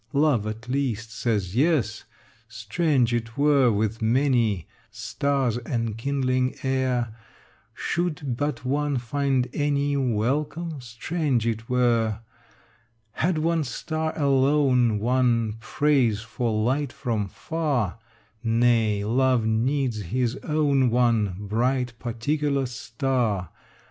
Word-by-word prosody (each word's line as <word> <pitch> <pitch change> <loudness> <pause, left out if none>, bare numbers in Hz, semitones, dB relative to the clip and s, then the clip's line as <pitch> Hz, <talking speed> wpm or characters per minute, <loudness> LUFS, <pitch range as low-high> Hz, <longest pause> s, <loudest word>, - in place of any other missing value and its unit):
Love, 140 -7 +2
at 110 +2 -6
least, 120 -4 -2
says 105 -4 -1
yes. 130 -6 +1 0.4
Strange 120 +3 0
it 115 0 -3
were, 140 -4 +4
with 110 +2 -1
many 115 - +2 0.2
Stars 120 +3 -1
enkindling 130 +3 -1
air, 130 -4 0 0.6
Should 155 -7 -2
but 145 0 -3
one 145 +1 0
find 130 +1 0
any 145 -1 0
Welcome: 140 +6 -1
strange 125 +1 -1
it 115 -1 -2
were, 115 -3 +1 0.9
Had 165 +7 0
one 165 0 +1
star 155 +3 -3
alone 135 -5 +3
won 115 -1 +1
Praise 125 -6 +1
for 115 +1 -2
light 125 +6 0
from 115 -7 -2
far: 135 - -2 0.4
Nay, 115 -3 +2
love 125 +1 +2
needs 120 +1 0
his 120 +6 -1
own 145 -4 +2
one 115 -5 +2
Bright 120 +5 -1
particular 140 +4 -1
star. 125 -6 -2
125 Hz, 105 wpm, -25 LUFS, 115-140 Hz, 0.9 s, were